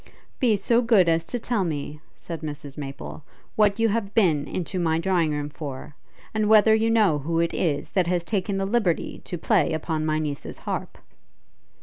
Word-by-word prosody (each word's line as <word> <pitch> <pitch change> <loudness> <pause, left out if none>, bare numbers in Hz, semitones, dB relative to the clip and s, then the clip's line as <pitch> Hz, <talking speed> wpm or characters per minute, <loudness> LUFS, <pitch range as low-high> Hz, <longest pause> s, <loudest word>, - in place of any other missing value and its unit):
'Be 235 -5 +3
so 230 +4 +2
good 225 -7 +4
as 165 0 +2
to 245 - -3
tell 235 -3 -1
me,' 150 -2 -4 0.2
said 165 -2 -7
Mrs 145 -2 -7
Maple, 140 +1 -7 0.3
'what 210 -1 +3
you 225 - +4
have 205 -1 -2
been 155 -9 +3
into 185 +1 -3
my 160 -2 +1
drawing 170 -1 +1
room 145 -1 -2
for? 145 -2 -7 0.4
and 215 -1 +1
whether 220 0 +6
you 220 +1 +2
know 210 -10 +3
who 165 +4 -1
it 170 0 +1
is, 145 -5 -1
that 185 -3 +1
has 175 -1 0
taken 195 +1 -1
the 195 - 0
liberty 200 -5 0
to 175 - -4
play 185 -1 +2
upon 160 0 -2
my 155 0 0
niece's 150 -2 -4
harp?' - - -5
175 Hz, 190 wpm, -25 LUFS, 155-210 Hz, 0.4 s, whether